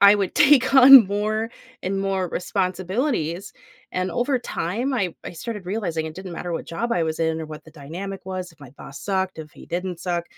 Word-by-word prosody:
I 200 +1 +8
would 195 -3 -2
take 270 -2 +5
on 265 -4 +10
more 215 +3 -1 0.3
and 195 +1 -2
more 195 -2 -1
responsibilities, 185 - -2 0.4
and 185 0 -1
over 255 +2 0
time 240 +4 -3
I 195 -9 -1
I - - -5
started 210 +4 -6
realizing 175 -5 -2
it 155 - -7
didn't 190 0 -8
matter 175 +1 -5
what 165 - -4
job 230 +9 -3
I 170 -2 +1
was 160 +1 -3
in, 160 0 0
or 160 - -5
what 155 0 -10
the 160 - -15
dynamic 175 +7 -8
was, 185 -1 -5
if 160 - -26
my 140 - -12
boss 135 +1 -11
sucked, 190 -3 -2
if 155 -1 -9
he - - -13
didn't 180 0 -4
suck. 175 -2 -2
185 Hz, 210 wpm, -23 LUFS, 165-210 Hz, 0.4 s, on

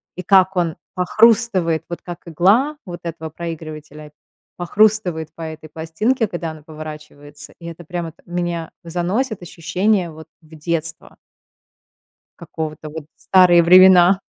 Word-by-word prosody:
и 185 - -5
как 190 0 +4
он 170 -3 0 0.2
похрустывает, 185 -3 +3
вот 170 - -6
как 175 -1 -7
игла 205 - +2
вот 175 -1 -7
этого 160 -2 -6
проигрывателя 155 -3 -8 0.4
похрустывает 180 -3 +1
по 165 - -12
этой 160 -1 -7
пластинке, 190 - -1
когда 175 -3 -5
она 155 -1 -12
поворачивается, 150 -1 -10
и 170 - -12
это 170 0 -8
прямо 170 0 -5
вот - - -27
меня 175 -2 -3
заносит, 180 +7 -2
ощущение 180 +2 -1
вот 160 +1 -12
в 160 0 -16
детство. 160 0 -4 1.2
Какого-то 155 -1 -6
вот. 150 -1 -8
Старые 180 -2 +5
времена. 185 +1 +7
170 Hz, 130 wpm, -19 LUFS, 160-185 Hz, 1.2 s, времена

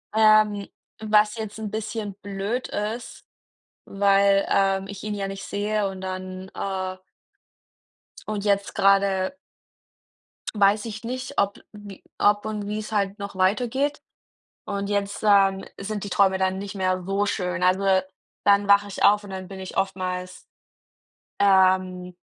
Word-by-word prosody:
Ähm, 215 -2 +4 0.3
was 210 0 +3
jetzt 220 -1 -6
'n 215 -2 -5
bisschen 215 -2 -4
blöd 200 +5 -3
ist, 220 +3 -5 0.6
weil, 200 0 +3
ähm, 195 0 +2
ich 200 -1 -8
ihn 210 -1 -3
ja 200 -1 -3
nicht 195 0 -7
sehe 205 0 -1
und 190 -1 -7
dann, 185 0 -6
äh 185 -1 -3 1.3
Und 210 -2 -3
jetzt 200 -1 +1
grade 195 +1 +3 1.2
weiß 205 0 +3
ich 215 0 -7
nicht, 255 +2 -5
ob 200 0 +1
wie 205 -2 -11 0.2
ob 205 +1 +3
und 210 -1 -4
wie 210 +1 -3
es 215 0 -6
halt 200 0 0
noch 200 -1 -7
weitergeht. 245 +10 +1 0.7
Und 200 -1 -3
jetzt, 200 0 -2
ähm, 195 -2 +4
sind 205 +1 -4
die 205 - -6
Träume 190 0 +3
dann 190 0 0
nicht 200 +1 -6
mehr 185 -1 0
so 200 +1 0
schön. 180 -3 -2
Also, 190 +1 +3 0.4
dann 200 0 +4
wache 200 0 +5
ich 200 - -5
auf 205 +1 +5
und 200 - -10
dann 190 -1 -6
bin 195 -1 -8
ich 185 - -8
oftmals, 185 -1 -3 0.9
ähm, 185 -2 +3
200 Hz, 145 wpm, -24 LUFS, 190-210 Hz, 1.3 s, wache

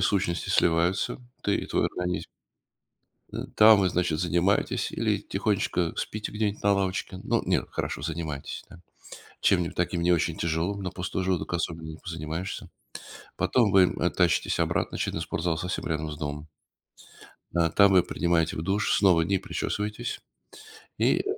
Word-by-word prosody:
сущности 95 -4 0
сливаются, 85 +6 +2 0.2
ты 100 - +2
и - - -4
твой - - +1
организм 90 0 -3 1.1
э, - - -6 0.2
там 110 -1 +8
вы, 95 -2 +3
значит, 85 -3 0
занимаетесь 90 +3 +1
или - - 0
тихонечко 85 -2 0
спите 110 0 -4
где-нибудь 105 -1 -2
на 100 0 +4
лавочке. 95 -1 -2
Ну, - - +1
нет, - - +1
хорошо - - -3
занимаетесь, 80 -4 -4
да. 90 - -14 0.6
Чем-нибудь 85 -1 +2
таким 85 0 0
не 90 +1 +4
очень 85 -1 +1
тяжелым, 85 +4 -1
на 95 - -3
пустой 95 0 -3
желудок 90 -2 -1
особенно 80 -1 -3
не 80 - -8
позанимаешься. 80 +2 -5 0.7
Потом 115 -6 +2
вы, 95 -1 +7 0.2
э, 90 - +2
тащитесь 90 -3 +1
обратно - - 0
очевидно 80 - -2
спортзал 80 0 -1
совсем 90 +2 -3
рядом 80 -1 -2
с 75 - -7
домом. 75 0 -5 1.1
Э, 85 -1 +3
там 100 +4 +5
вы 90 - +6
принимаете 85 -3 0
в 80 - -2
душ, 95 +4 +1
снова 90 -5 +5
не 95 +4 +1
причесываетесь 105 +3 -3 0.8
и, - - +3
э, - - -1
90 Hz, 155 wpm, -27 LUFS, 80-95 Hz, 1.1 s, там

